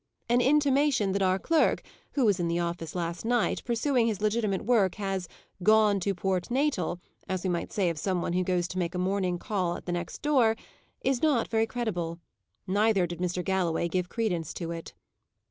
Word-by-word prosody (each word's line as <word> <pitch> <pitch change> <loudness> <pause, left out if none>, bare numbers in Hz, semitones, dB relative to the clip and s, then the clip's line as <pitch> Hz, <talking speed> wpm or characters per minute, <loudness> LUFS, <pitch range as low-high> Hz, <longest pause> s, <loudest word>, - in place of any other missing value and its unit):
An 240 +1 +3
intimation 280 -5 +3
that 200 +1 0
our 185 0 +3
clerk, 325 - +2 0.3
who 270 -4 +2
was 200 -3 +3
in 175 - 0
the 170 0 0
office 170 -1 -3
last 170 -1 -3
night, 240 0 +1
pursuing 240 0 +1
his 215 -4 -1
legitimate 210 -2 0
work, 205 -6 +3
has 195 -3 -3 0.3
"gone 215 0 +5
to 195 +1 -1
Port 185 +1 -1
Natal," 245 - 0 0.3
as 185 -1 -2
we 185 - 0
might 170 - -3
say 200 -5 +1
of 165 -3 -1
some 185 +3 0
one 170 - -2
who 185 +1 +1
goes 180 -1 0
to 185 - -3
make 175 0 -2
a - - -1
morning 185 -1 0
call 180 -2 -1
at - - -12
the 175 - -3
next 175 -1 -4
door, 255 -7 +4 0.5
is 265 -2 0
not 285 -7 +2
very 225 0 +2
credible. 175 -10 -3 0.5
Neither 200 0 +2
did 175 0 -6
Mr. 180 0 -2
Galloway 180 -3 +1
give 180 +1 -1
credence 180 -9 -2
to 170 -2 -4
it. 165 -1 -7
190 Hz, 195 wpm, -28 LUFS, 175-225 Hz, 0.5 s, gone